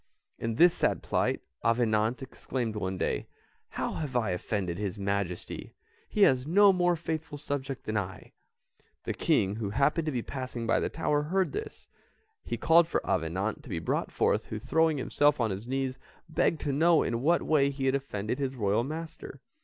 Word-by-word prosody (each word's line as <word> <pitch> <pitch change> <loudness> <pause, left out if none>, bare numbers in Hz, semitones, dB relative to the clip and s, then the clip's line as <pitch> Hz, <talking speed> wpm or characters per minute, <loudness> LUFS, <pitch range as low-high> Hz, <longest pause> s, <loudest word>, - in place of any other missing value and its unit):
In 115 -1 -2
this 170 +6 +6
sad - - +1
plight, - - 0 0.2
Avenant 115 +1 +2
exclaimed 125 -3 -4
one 95 -2 -2
day, - - -1 0.4
"How - - -3
have 145 -5 -4
I 110 -6 +1
offended 90 -1 -2
his 100 -3 -3
Majesty? 100 -3 -3 0.3
He 210 - +3
has 130 -4 +4
no 200 +4 +6
more 175 -1 +2
faithful 160 -2 -4
subject 140 -2 -4
than 110 - -3
I." 95 -2 -5 0.7
The - - -2
King 100 +2 +1
who 110 -3 -2
happened 145 +8 +1
to - - +1
be 120 -4 -2
passing 130 -3 -5
by 115 - +3
the - - -1
tower, 150 -2 0
heard 185 +5 0
this; 430 +2 -6 0.6
he - - -3
called 165 0 +5
for - - -1
Avenant 95 +5 -1
to - - -13
be - - -2
brought - - -1
forth - - +1
who, - - -5
throwing 160 0 +2
himself 145 +2 +2
on 115 -3 +1
his 100 +5 -5
knees, 130 0 -2 0.3
begged 160 -1 +1
to 145 - -1
know 165 +3 +4
in 115 0 -1
what 170 +5 +3
way 140 -3 +3
he 135 -1 -3
had 130 - +3
offended 125 -3 -2
his 135 -1 -2
royal 105 -1 +1
master. 155 0 -7
130 Hz, 185 wpm, -29 LUFS, 110-155 Hz, 0.7 s, this